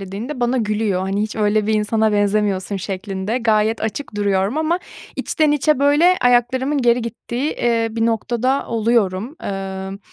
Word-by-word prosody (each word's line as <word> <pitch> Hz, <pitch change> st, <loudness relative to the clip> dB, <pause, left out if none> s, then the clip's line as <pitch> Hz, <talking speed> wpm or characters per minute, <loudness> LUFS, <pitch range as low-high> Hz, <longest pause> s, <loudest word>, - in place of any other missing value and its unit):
dediğimde 210 Hz, +9 st, -6 dB
bana 245 Hz, +2 st, +1 dB
gülüyor. 210 Hz, -4 st, 0 dB
Hani, 195 Hz, +2 st, -1 dB
"Hiç 215 Hz, +1 st, -4 dB
öyle 210 Hz, 0 st, +1 dB
bir 220 Hz, -, +1 dB
insana 215 Hz, 0 st, +1 dB
benzemiyorsun." 205 Hz, -1 st, 0 dB
şeklinde. 195 Hz, +3 st, -3 dB
Gayet 220 Hz, -1 st, +1 dB
açık 220 Hz, +3 st, -4 dB
duruyorum 200 Hz, +5 st, 0 dB
ama 320 Hz, +3 st, +1 dB, 0.4 s
içten 310 Hz, -2 st, +1 dB
içe 295 Hz, 0 st, +2 dB
böyle 295 Hz, +6 st, +4 dB
ayaklarımın 250 Hz, +4 st, +2 dB
geri 240 Hz, -1 st, +3 dB
gittiği, 240 Hz, +4 st, -3 dB
eee, 230 Hz, -1 st, 0 dB
bir 225 Hz, +1 st, 0 dB
noktada 240 Hz, +4 st, 0 dB
oluyorum. 225 Hz, -, 0 dB
Emm, 195 Hz, 0 st, -5 dB
220 Hz, 150 wpm, -20 LUFS, 205-245 Hz, 0.4 s, böyle